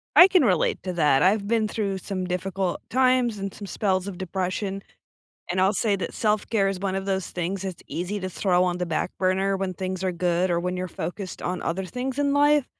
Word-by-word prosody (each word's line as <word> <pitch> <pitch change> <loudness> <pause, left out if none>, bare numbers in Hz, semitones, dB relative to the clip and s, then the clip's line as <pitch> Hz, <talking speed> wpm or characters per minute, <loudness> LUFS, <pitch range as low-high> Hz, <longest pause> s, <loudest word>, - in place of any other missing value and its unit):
I 355 - +10
can 365 -6 +4
relate 185 -8 +2
to 185 -1 -3
that. 150 -5 +3
I've 200 +2 +3
been 225 -1 +2
through 200 -3 -2
some 185 -2 -4
difficult 185 0 -2
times 255 -3 +3
and 195 -1 -4
some 200 - -8
spells 190 -2 0
of 185 -3 -6
depression, 190 +2 -3 0.7
and 185 +1 +1
I'll 190 +2 +4
say 205 0 +1
that 185 - -4
self-care 210 -1 +1
is 190 -1 -3
one 195 -1 -1
of 195 0 -3
those 190 -1 -1
things 180 +2 -3
that's 190 -3 -6
easy 180 +5 -3
to 185 - -3
throw 180 0 +2
on 180 -1 -1
the 180 - -1
back 165 +2 -1
burner 190 +1 +1
when 190 -1 -3
things 185 0 -4
are 185 -1 0
good 175 +1 +1
or 170 - +2
when 180 +1 -2
you're 185 0 -3
focused 180 +4 -5
on 180 +1 -3
other 185 +3 -2
things 255 +7 -4
in 280 -1 +2
life, 290 -1 +4
190 Hz, 220 wpm, -25 LUFS, 180-205 Hz, 0.7 s, I